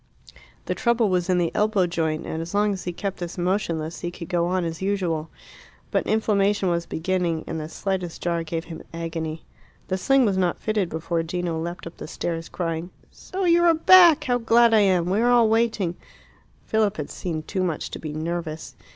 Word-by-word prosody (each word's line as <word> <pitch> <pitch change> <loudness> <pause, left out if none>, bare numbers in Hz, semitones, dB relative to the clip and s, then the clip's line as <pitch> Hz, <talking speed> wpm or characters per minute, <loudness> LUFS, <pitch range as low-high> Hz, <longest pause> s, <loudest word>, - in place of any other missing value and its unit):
The - - -1
trouble 235 -3 +2
was 180 -1 0
in 180 - +3
the 170 -2 +1
elbow 210 -3 +2
joint, 160 -3 -2
and 160 - -4
as 170 +4 -6
long 205 0 +2
as 190 - -7
he 180 - -2
kept 195 +2 -4
this 175 0 -6
motionless 170 -3 -1
he 175 - -3
could 175 -1 -9
go 175 -2 +1
on 180 -1 0
as 165 +1 -5
usual. 180 -5 -1 0.6
But - - 0
inflammation 205 -3 +2
was 170 -1 -1
beginning, 170 -1 -1
and 165 - -4
the 155 0 -6
slightest 185 -2 -3
jar 170 -1 -1
gave 165 0 -4
him 165 - -8
agony. 165 -1 -4 0.4
The 185 0 -1
sling 270 +5 +4
was 195 -3 +1
not 180 -2 +1
fitted 210 -5 -1
before 165 +1 -2
Gino 170 0 -3
leapt 175 +2 -5
up 165 - -9
the - - -7
stairs, 165 -1 -4
crying 165 -1 -3 0.2
"So 380 0 -5
you 345 0 +4
are 335 -1 +5
back! 340 -1 +7
How 245 -3 +1
glad 230 0 +4
I 220 - +6
am! 185 -4 +3
We 195 +4 +1
are 240 - +3
all 240 -2 +5
waiting 220 -6 +1 0.4
" - - -33
Philip 215 -1 +1
had - - -5
seen 165 -4 -4
too 185 +4 -3
much 170 -4 -2
to - - -6
be 155 - -5
nervous. 160 0 -4
180 Hz, 205 wpm, -24 LUFS, 165-210 Hz, 0.6 s, back